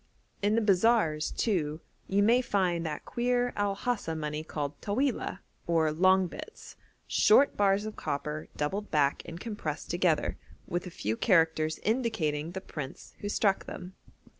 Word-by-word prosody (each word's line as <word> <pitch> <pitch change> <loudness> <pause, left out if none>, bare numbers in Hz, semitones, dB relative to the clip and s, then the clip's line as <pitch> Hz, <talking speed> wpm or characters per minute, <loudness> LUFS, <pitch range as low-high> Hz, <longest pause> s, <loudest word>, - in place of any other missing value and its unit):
In 205 +1 +2
the 230 - +3
bazaars, 195 -6 +3
too, 160 -8 -1 0.3
you 200 +1 +2
may 235 +4 +5
find 185 -7 0
that 150 -1 -5
queer 245 0 0
El 205 -1 0
Hasa 205 -7 -2
money 150 0 -3
called 145 -2 -5
Tawilah, 215 -3 -1 0.3
or 160 -2 +2
'long 185 +4 +4
bits,' 175 - -9 0.3
short 270 +7 +5
bars 200 0 +2
of 215 - -5
copper 150 +2 -3
doubled 195 +8 -2
back 145 -2 +2
and 165 +1 -8
compressed 180 -9 -4
together, 175 -3 +1 0.3
with 175 +1 -3
a - - -5
few 110 - -2
characters 160 - +2
indicating 175 - 0
the 190 - -4
prince 145 -7 -8
who 205 - -4
struck 200 -2 +1
them. 180 +1 -8
185 Hz, 150 wpm, -29 LUFS, 155-210 Hz, 0.3 s, may